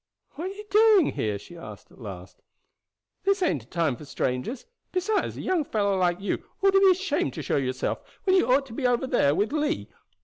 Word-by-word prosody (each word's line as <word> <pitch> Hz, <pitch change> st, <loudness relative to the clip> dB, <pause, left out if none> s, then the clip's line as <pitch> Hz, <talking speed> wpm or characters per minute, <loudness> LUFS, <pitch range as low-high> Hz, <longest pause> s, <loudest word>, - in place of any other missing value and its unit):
"What 330 Hz, -, -6 dB
are 380 Hz, -, -4 dB
you 420 Hz, +1 st, -9 dB
doing 425 Hz, -5 st, +5 dB
here?" 105 Hz, -2 st, -2 dB
she 105 Hz, +12 st, -13 dB
asked 105 Hz, -12 st, -11 dB
at -, -, -18 dB
last. 95 Hz, -4 st, -9 dB, 0.8 s
"This 395 Hz, -1 st, +2 dB
ain't 155 Hz, -, +1 dB
a -, -, -29 dB
time 165 Hz, -5 st, 0 dB
for 150 Hz, -, -12 dB
strangers; 130 Hz, -, -3 dB, 0.3 s
besides 390 Hz, +4 st, -1 dB
a -, -, -5 dB
young 365 Hz, -4 st, +1 dB
fellow 205 Hz, -7 st, 0 dB
like 180 Hz, -2 st, +1 dB
you 200 Hz, -, -2 dB, 0.2 s
ought 390 Hz, -, +6 dB
to 390 Hz, -, +6 dB
be 390 Hz, -1 st, +6 dB
ashamed 355 Hz, -, 0 dB
to -, -, -5 dB
show -, -, 0 dB
yourself 130 Hz, -1 st, -1 dB, 0.2 s
when 380 Hz, -3 st, +3 dB
you 250 Hz, -10 st, +3 dB
ought 275 Hz, +2 st, +4 dB
to 245 Hz, -, -11 dB
be 255 Hz, +1 st, 0 dB
over 245 Hz, +1 st, +1 dB
there 195 Hz, -, +2 dB
with 210 Hz, -, 0 dB
Lee. 305 Hz, +1 st, -1 dB
245 Hz, 215 wpm, -26 LUFS, -, 0.8 s, ought